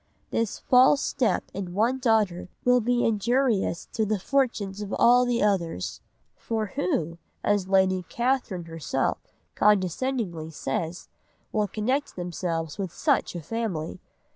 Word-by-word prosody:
This 230 -3 -1
false 255 +2 +5
step 250 -5 +1
in 185 -2 -5
one 235 +6 +2
daughter 215 -8 +1 0.2
will 250 0 +5
be 245 +2 +1
injurious 230 -3 +1
to 220 - +1
the 215 0 0
fortunes 210 -4 0
of 205 -1 -5
all 245 +1 +6
the 240 -2 +1
others; 170 - -1 0.3
for 220 -3 -3
who, 170 -1 -1 0.2
as 205 -2 +1
Lady 190 -1 +3
Catherine 235 -8 -1
herself 165 -3 -2 0.3
condescendingly 195 -3 +1
says, 160 +3 -4 0.4
will 210 -1 +1
connect 255 +9 -1
themselves 170 -1 -3
with 190 -3 -3
such 285 - 0
a 170 - -5
family? 190 -5 -3
205 Hz, 130 wpm, -26 LUFS, 175-240 Hz, 0.4 s, all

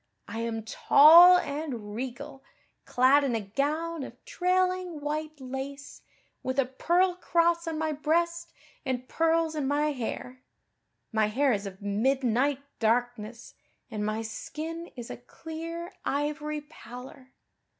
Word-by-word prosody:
I 225 - -5
am 230 -1 -3
tall 335 +10 +8
and 280 -10 -4
regal, 265 +4 -6 0.4
clad 265 +3 +4
in 260 -4 0
a - - 0
gown 300 +10 -2
of - - -10
trailing 365 -2 0
white 305 +1 -4
lace, 270 +2 -7 0.4
with 260 +1 -3
a 275 - +3
pearl 345 +8 +1
cross 340 -1 +1
on 320 -1 -2
my 315 0 -1
breast 335 +3 0 0.3
and 255 -2 -3
pearls 330 0 +1
in 295 -3 -2
my 295 +2 +1
hair. 250 0 -5 0.7
My 220 -1 +2
hair 260 +5 +2
is 200 -1 -2
of 195 +1 -10
midnight 255 +5 +1 0.2
darkness 235 0 -1 0.4
and 210 -1 -3
my 215 +1 -2
skin 320 +9 -6
is 240 -2 -7
a - - -6
clear 330 +6 -7
ivory 300 +1 -2
pallor. 260 -3 -12
280 Hz, 130 wpm, -28 LUFS, 245-320 Hz, 0.7 s, tall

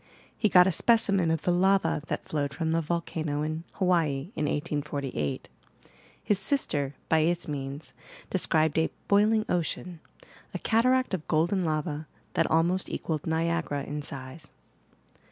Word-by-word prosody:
He 215 - +1
got 180 -2 +7
a 190 - +3
specimen 195 -2 +3
of 160 -1 0
the 180 - +2
lava 185 -3 +2
that - - -4
flowed 145 -2 -2
from 160 +2 -1
tbo 165 +1 +2
volcano 155 -2 -2
in 155 +2 -3
Hawaii 165 -4 +1
in 150 - -1
1848. 145 - -2 0.8
His 205 -2 +1
sister, 145 - 0
by 160 - +3
its 170 +2 +1
means, 140 0 -5 0.4
described 160 -4 +2
a 160 - +2 0.2
"boiling 215 +2 +4
ocean," 175 0 -2 0.6
a - - +1
cataract 255 +1 +2
of 175 -5 -3
golden 175 +5 +2
lava 155 -1 -2 0.3
that - - +1
almost 170 +4 +2
equalled 155 -2 -3
Niagara 165 -3 0
in 150 +2 -4
size. 140 +2 -7
160 Hz, 140 wpm, -28 LUFS, 150-185 Hz, 0.8 s, got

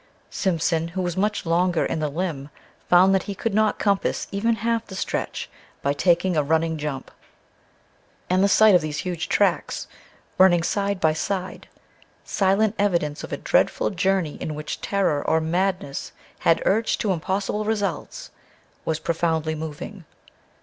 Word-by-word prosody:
Simpson, 165 -3 0
who 185 +3 -3
was 175 -1 -2
much 205 +1 0
longer 170 +1 +2
in - - -2
the 155 -1 -1
limb, 150 -3 -3 0.4
found 185 +2 +6
that 190 - +3
he 200 - -3
could 225 +2 -2
not 215 +1 +2
compass 200 -2 0
even 225 +3 +1
half 230 +1 -1
the 190 - -8
stretch - - -3 0.4
by 140 - +2
taking 175 +4 +2
a 155 - +3
running 160 +2 +1
jump. 145 -3 -5 1.2
And 185 +1 +2
the - - +5
sight 215 +1 +6
of 180 - +6
these 155 -1 -4
huge 175 0 -3
tracks, - - +1 0.5
running 175 -3 +6
side 200 +1 -1
by 160 -2 +3
side, 185 +3 -4 0.6
silent 195 +2 +2
evidence 170 -7 0
of - - -8
a - - -2
dreadful - - +1
journey 190 -4 0
in 155 - -3
which 150 0 -5
terror 190 -8 +1
or 160 - +2
madness 175 -3 -2 0.3
had 165 - +2
urged 220 +3 +1
to 205 - +1
impossible 195 +4 -2
results, 210 -3 -3 0.5
was 160 - -1
profoundly 160 -1 -1
moving. 160 +5 -7
180 Hz, 155 wpm, -23 LUFS, 160-200 Hz, 1.2 s, found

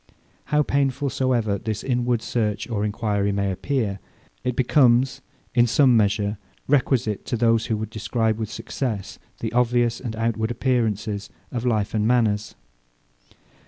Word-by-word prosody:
How 150 0 +2
painful 140 -1 0
soever 115 -6 0
this 110 -1 -4
inward 120 -2 0
search 105 -4 -1
or 110 -4 -2
enquiry 105 -1 0
may 100 -1 0
appear, 105 -1 -2 0.4
it 125 -1 -1
becomes, 130 0 +3 0.3
in 120 -1 +4
some 130 +1 +4
measure, 105 -1 +1 0.3
requisite 125 -6 +1
to 120 - -2
those, 115 0 +2
who 110 - 0
would 110 0 -5
describe 110 +1 -1
with 110 -2 -3
success 110 -4 -4 0.2
the 115 0 -3
obvious 120 -1 +2
and 115 -4 -5
outward 110 0 -1
appearances 110 -5 -1 0.2
of 125 -1 -2
life 110 -4 0
and 105 -1 +1
manners. 110 -4 +1
115 Hz, 140 wpm, -23 LUFS, 105-125 Hz, 0.4 s, in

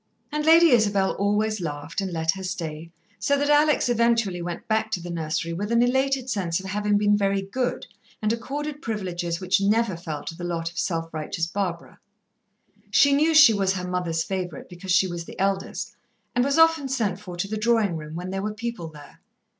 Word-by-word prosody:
And 300 0 -1
Lady 330 +1 +7
Isabel 205 -5 +3
always 210 +1 0
laughed, 150 +2 -4
and 190 -1 -3
let 160 -1 +1
her 190 - -7
stay, 165 -3 -5 0.3
so 280 +8 +2
that 285 +1 +1
Alex 295 -2 +4
eventually 230 -6 +1
went 170 0 -6
back 220 0 +1
to - - 0
the 175 0 -7
nursery 165 0 -2
with 205 +6 -3
an 235 0 +4
elated 265 +1 +1
sense 190 -8 -1
of 190 - -9
having 205 +1 0
been 205 0 +3
very 195 -1 +1
good, 250 +6 -2 0.3
and 215 +1 +1
accorded 290 +5 -5
privileges 175 -6 -3
which 185 +2 +1
never 210 0 +2
fell 160 -3 -6
to - - -6
the 175 - -8
lot 165 -1 -3
of 165 - -6
self 165 -2 -2
righteous 155 +1 -2
Barbara. 170 -1 -4 0.9
She 280 0 +5
knew 310 +3 +3
she 290 -7 +9
was 195 -2 +1
her 180 -1 -4
mother's 175 -3 -1
favourite, 180 -5 -5
because 180 +1 -6
she 180 +1 +5
was 175 -2 -5
the - - -11
eldest, 195 0 -2 0.4
and 245 - +2
was 280 +2 +1
often 325 -3 +4
sent 220 -8 -1
for 185 -3 -9
to 180 - -2
the 215 - -3
drawing 215 -4 +2
room 155 0 -7
when 180 +2 -5
there 195 0 -2
were 210 +1 -3
people 230 -6 -5
there. 150 -2 -14
195 Hz, 200 wpm, -24 LUFS, 170-235 Hz, 0.9 s, she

